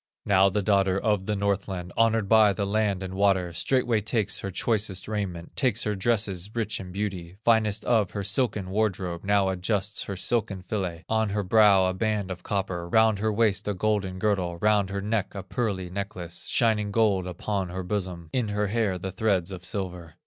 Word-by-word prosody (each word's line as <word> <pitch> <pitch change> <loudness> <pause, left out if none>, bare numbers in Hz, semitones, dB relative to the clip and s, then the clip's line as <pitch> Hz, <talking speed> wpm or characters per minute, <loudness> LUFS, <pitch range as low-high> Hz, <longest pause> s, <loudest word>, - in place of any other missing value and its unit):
Now 95 0 +5
the 100 +1 -1
daughter 95 -1 +2
of 105 -3 0
the 105 - 0
Northland, 95 -3 -2
Honored 115 -2 +2
by 110 -1 +5
the 100 +1 -2
land 100 -2 0
and 95 0 -6
water, 95 -3 +2
Straightway 120 +4 +1
takes 105 -1 0
her 100 - -4
choicest 100 -1 -1
raiment, 95 -6 -4
Takes 125 -5 +1
her 105 - 0
dresses 100 -3 0
rich 110 -2 -2
in 90 -1 -8
beauty, 95 -3 -4
Finest 110 -2 +2
of 110 -6 +2
her 100 - -4
silken 105 -5 0
wardrobe, 95 -5 -1
Now 100 -1 +2
adjusts 95 +2 -1
her 100 - -4
silken 100 -2 -1
fillet, 90 -4 -4
On 110 -1 +1
her 105 +1 -1
brow 100 -1 +5
a 95 - 0
band 105 -1 -1
of 90 -1 -6
copper, 90 -3 -3
Round 110 0 +4
her 110 +1 +1
waist 105 -2 +1
a 105 - -1
golden 100 -1 -1
girdle, 95 -4 0
Round 105 +1 +2
her 100 0 -3
neck 105 0 -2
a 100 - -5
pearly 95 -4 -3
necklace, 90 -3 -6
Shining 110 -4 +1
gold 100 -4 +2
upon 95 +1 -3
her 95 +1 -4
bosom, 90 -4 -4
In 125 -4 0
her 105 0 -1
hair 105 -4 0
the 95 +1 -5
threads 95 -2 0
of 90 -2 -7
silver. 90 -4 -4
100 Hz, 190 wpm, -26 LUFS, 95-105 Hz, -, Now